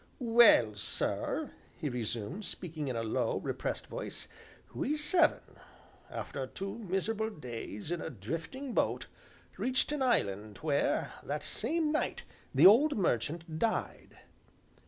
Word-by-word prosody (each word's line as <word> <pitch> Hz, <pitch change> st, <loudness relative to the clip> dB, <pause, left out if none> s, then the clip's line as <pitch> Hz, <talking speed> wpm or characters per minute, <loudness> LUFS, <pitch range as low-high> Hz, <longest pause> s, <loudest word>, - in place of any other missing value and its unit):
"Well, 230 Hz, -, +6 dB
sir," 105 Hz, -, -2 dB, 0.3 s
he 150 Hz, -, -3 dB
resumed, 120 Hz, -, -3 dB
speaking 155 Hz, -5 st, -4 dB
in 130 Hz, -, -2 dB
a 115 Hz, -, -1 dB
low, 110 Hz, -, 0 dB
repressed -, -, -3 dB
voice, -, -, -6 dB, 0.5 s
"we 300 Hz, +3 st, -1 dB
seven, 335 Hz, +4 st, +3 dB, 0.7 s
after 135 Hz, -2 st, -4 dB
two 195 Hz, -, -5 dB
miserable 220 Hz, +2 st, -1 dB
days 120 Hz, -, -7 dB
in 175 Hz, -, -1 dB
a -, -, -4 dB
drifting 165 Hz, -, -5 dB
boat, -, -, +1 dB, 0.5 s
reached 255 Hz, +3 st, +1 dB
an 300 Hz, -2 st, -1 dB
island 105 Hz, -, +1 dB
where, 145 Hz, -3 st, +1 dB
that -, -, -3 dB
same 320 Hz, -2 st, 0 dB
night, 305 Hz, -, -1 dB, 0.3 s
the -, -, +5 dB
old 275 Hz, +9 st, +7 dB
merchant 160 Hz, -, -1 dB
died. 225 Hz, -1 st, -2 dB
170 Hz, 125 wpm, -32 LUFS, -, 0.7 s, old